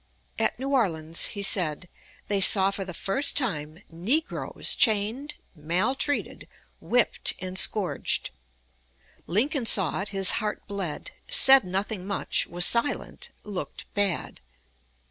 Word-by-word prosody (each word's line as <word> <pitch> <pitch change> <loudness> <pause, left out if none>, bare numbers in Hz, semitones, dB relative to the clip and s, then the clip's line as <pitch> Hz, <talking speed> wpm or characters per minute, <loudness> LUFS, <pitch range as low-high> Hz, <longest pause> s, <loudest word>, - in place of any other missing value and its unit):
At - - +1
New 270 +2 -5
Orleans, 165 - 0
he 200 - -3
said, 180 -3 0 0.4
they 200 -1 -1
saw 195 0 +6
for 195 0 -4
the 185 - -7
first 200 - 0
time 160 - -3
"negroes 215 - -1
chained, 225 +5 +1 0.2
maltreated, 190 - -2 0.3
whipped, 245 -1 +1
and 185 0 -7
scourged. 190 0 +1 1.0
Lincoln 245 - 0
saw 195 -3 +3
it; 195 - -6
his 195 -1 +3
heart 210 -1 -4
bled; 195 -6 -6 0.2
said 270 - +6
nothing 190 +1 -4
much, 200 - -2
was 175 +1 +4
silent, 235 +5 0
looked 205 -3 -7
bad. 200 -5 -1
200 Hz, 120 wpm, -25 LUFS, 180-235 Hz, 1.0 s, saw